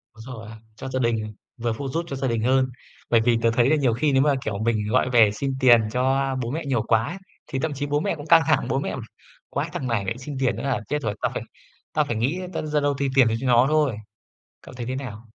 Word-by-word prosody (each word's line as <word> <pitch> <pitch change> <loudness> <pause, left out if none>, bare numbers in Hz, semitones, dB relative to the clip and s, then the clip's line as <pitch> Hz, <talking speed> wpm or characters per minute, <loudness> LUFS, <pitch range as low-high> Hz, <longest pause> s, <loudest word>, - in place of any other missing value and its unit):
Đúng 110 - -12
rồi 110 -1 -9
á, 110 - -10 0.2
cho 130 +4 -7
gia 130 0 -2
đình, 110 -3 -1 0.2
vừa 115 -1 -1
phụ 135 +5 -5
giúp 165 +5 -2
cho 140 - -4
gia 135 0 -2
đình 115 -3 -1
hơn, 130 +2 +3 0.4
bởi 115 -1 +4
vì 115 0 +3
tớ 115 0 +3
thấy 120 +2 +3
là 155 - +4
nhiều 135 -6 +2
khi 145 +5 +1
nếu 135 0 +4
mà, 145 -1 +3
kiểu, 105 -2 -2
mình 110 -2 0
gọi 125 +2 +2
về 115 -4 +5
xin 135 +6 -3
tiền 120 -3 +7
cho 135 +2 +1
bố 120 0 -3
mẹ 155 +2 -3
nhiều 130 -5 +1
quá 110 0 +2
ấy 175 - -5 0.3
thì 135 - -3
thậm 155 0 -1
chí 145 +1 -3
bố 145 +1 0
mẹ 165 - -1
cũng 150 0 -9
căng 165 0 +7
thẳng, 155 -6 +2
bố 135 - +1
mẹ: - - -3 0.5
"Quái - - -2
thằng 130 - -3
này 115 -4 0
lại 115 +5 -2
xin 135 +2 -7
tiền 130 -2 +1
nữa - - -6
là 135 -2 0
chết 150 0 -1
rồi, 110 -4 -2
tao - - 0
phải - - -4 0.5
tao 150 -1 +2
phải 120 - -3
nghĩ 130 +11 0
ta - - -2
ra 150 -1 0
đâu 145 0 +1
thì 140 - +1
tiền 130 -3 +6
cho 130 - -3
nó 120 0 +5
thôi." 150 -8 +2 0.6
Cậu - - -13
thấy 120 -2 -6
thế 130 - -2
nào? 115 -4 -7
130 Hz, 275 wpm, -24 LUFS, 115-140 Hz, 0.6 s, tiền